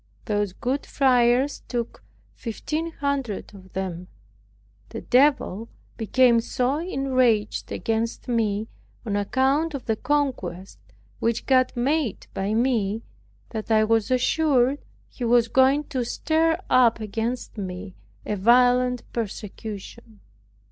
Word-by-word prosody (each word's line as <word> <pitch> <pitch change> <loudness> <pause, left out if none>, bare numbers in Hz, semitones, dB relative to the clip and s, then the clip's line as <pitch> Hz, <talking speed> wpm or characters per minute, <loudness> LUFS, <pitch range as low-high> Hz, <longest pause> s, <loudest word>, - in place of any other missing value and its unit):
Those 205 -3 -1
good 260 +7 -2
friars 255 0 +3
took 240 -2 -4 0.3
fifteen 310 +8 -4
hundred 280 -10 -3
of 190 -2 -14
them. 180 -2 -4 0.8
The - - -6
devil 250 -5 +2 0.3
became 235 +2 +3
so 250 +4 -1
enraged 255 - 0
against 225 +2 -2
me 220 -3 0 0.4
on 205 -3 -1
account 270 +9 +1
of 270 - -6
the 220 - 0
conquest 245 - -2 0.4
which 230 0 -1
God 255 -1 +3
made 270 0 0
by 200 +3 -1
me, 225 -3 0 0.5
that 220 -1 -6
I 215 -1 +4
was 225 +1 +1
assured 265 +1 +2 0.3
he 250 - -8
was 235 0 +4
going 265 +3 +4
to 255 -2 -1
stir 320 +6 +1
up 240 -3 +4
against 225 +2 -4
me 185 0 -6 0.3
a 210 - -2
violent 245 +3 +4
persecution. 215 0 -7
240 Hz, 115 wpm, -24 LUFS, 215-265 Hz, 0.8 s, I